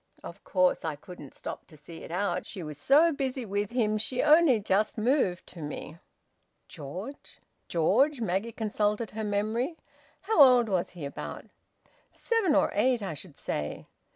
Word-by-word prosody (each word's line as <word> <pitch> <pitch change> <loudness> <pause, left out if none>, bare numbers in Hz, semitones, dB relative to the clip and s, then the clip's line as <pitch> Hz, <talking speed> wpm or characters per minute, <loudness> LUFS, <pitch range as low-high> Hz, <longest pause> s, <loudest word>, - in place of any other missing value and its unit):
Of - - -10
course 185 -2 +2
I 160 -2 -2
couldn't 145 -2 -12
stop - - -7
to 155 - -15
see 165 +3 -11
it - - -10
out. 180 +1 -1
She 190 -5 -7
was 150 -2 -8
so 310 - +5
busy 265 -3 -3
with 205 0 -2
him 215 -3 0
she 245 +4 0
only 305 -5 +6
just 210 +2 0
moved 215 -6 +1
to 170 - -10
me." 150 +2 -7 0.7
"George? 180 - -8 0.3
George?" 240 - +2
Maggie 215 +1 -1
consulted 210 0 -1
her 220 +1 -4
memory. 215 +9 -1 0.4
"How 440 -8 +3
old 250 -4 +7
was 185 -3 0
he, 155 - -5
about?" 140 - -7 0.7
"Seven 440 -10 +1
or - - +3
eight, 240 +2 +2
I 190 - -3
should 150 0 -11
say." 75 0 -4
210 Hz, 160 wpm, -28 LUFS, 175-255 Hz, 0.7 s, old